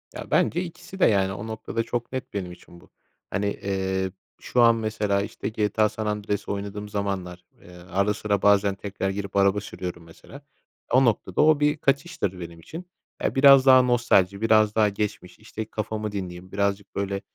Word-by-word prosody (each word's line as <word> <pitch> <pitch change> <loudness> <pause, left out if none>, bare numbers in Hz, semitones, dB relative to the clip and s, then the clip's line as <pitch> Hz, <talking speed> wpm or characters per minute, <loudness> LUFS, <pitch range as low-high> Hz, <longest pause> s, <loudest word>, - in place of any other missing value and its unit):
Ya, - - -8
bence 175 - +2
ikisi 180 +2 -10
de, - - +5
yani. 95 -2 +2
O 105 +3 -7
noktada 110 +1 -3
çok 120 +1 -4
net 130 0 -5
benim 95 -3 -4
için 85 0 -15
bu. - - -21 0.4
Hani, 105 0 -2
eee, 95 -2 -2 0.3
şu 125 - +1
an 115 -1 +6
mesela, 105 -3 -1
işte, 110 +2 -5
GTA: 110 0 +1
San 110 +1 -5
Andreas 105 -1 -3
oynadığım 100 +1 -5
zamanlar, 95 -3 -4 0.2
eee, - - -16
ara 90 +3 -1
sıra 100 -2 -1
bazen 100 -1 +4
tekrar 100 -1 -4
girip 100 0 -5
araba 100 +1 +3
sürüyorum 90 -4 -7
mesela. 85 - -14 0.5
O 130 +1 +5
noktada 95 -5 +1
o 155 -1 +5
bir 150 +1 +2
kaçıştır 140 - -1
benim 85 -1 -9
için. 165 - -9 0.4
Ya, - - -1
biraz 135 -1 +7
daha 130 -1 +8
nostalji, 110 -6 +2
biraz 110 -1 +3
daha 110 -2 +4
geçmiş, 100 -3 -5
işte, 110 0 -7
kafamı 110 0 -4
dinleyeyim, 95 -2 -6
birazcık, 100 0 -2
böyle, 100 0 -2
105 Hz, 175 wpm, -25 LUFS, 95-115 Hz, 0.5 s, daha